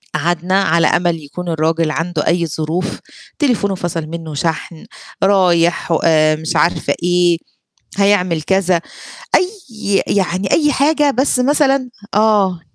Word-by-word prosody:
قعدنا 175 +3 0
على 165 -3 +2
أمل 170 -3 0
يكون 175 +5 -7
الراجل 160 0 0
عنده 165 0 -2
أي 170 0 +2
ظروف، 160 +5 -3 0.4
تليفونه 225 -9 +1
فصل 170 -3 -4
منه 165 -1 -7
شحن، 160 +2 -4 0.4
رايح 175 -4 +2
و 165 - +3
آآ 155 -1 +3
مش 160 0 -4
عارفة 170 - +1
إيه، 175 -1 +2 0.6
هيعمل 185 -5 +2
كذا، 185 0 +1 0.6
أيّ 365 - +1 0.6
يعني 190 -1 -1
أيّ 295 -2 +3
حاجة 295 +1 +2
بس 265 +1 +1
مثلًا 270 0 +2 0.3
آه. 205 -4 +2
175 Hz, 125 wpm, -16 LUFS, 165-200 Hz, 0.6 s, و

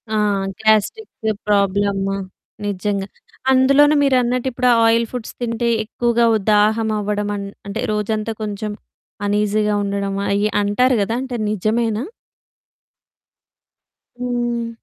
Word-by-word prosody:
ఆ! - - +2 0.5
Gastric 220 - +1 0.2
problem 200 -1 +1 0.5
నిజంగా. 200 0 -2 0.4
అందులోనూ 275 +3 +5
మీరన్నట్టు 250 -2 +2
ఇప్పుడా 250 0 +2
ఆయిల్ 230 +1 +3
ఫుడ్స్ 245 -3 -6
తింటే 235 0 -1
ఎక్కువగా 235 +1 +1
ఉ - - +4
దాహం 215 +2 +3
అవ్వడం 205 0 -2
అం 200 - -4 0.2
అంటే 200 +3 -4
రోజంతా 215 +1 -1
కొంచెం 210 0 -4 0.5
అనీజీగా 210 +1 +1
ఉండడము 200 0 -2
అయి 205 +1 +1
అంటారు 250 +6 +2
గదా! 225 +3 -1
అంటే 260 -2 -5
నిజమేనా? 215 +2 0 2.1
హ్మ్. 240 -1 -2
215 Hz, 105 wpm, -19 LUFS, 205-240 Hz, 2.1 s, అందులోనూ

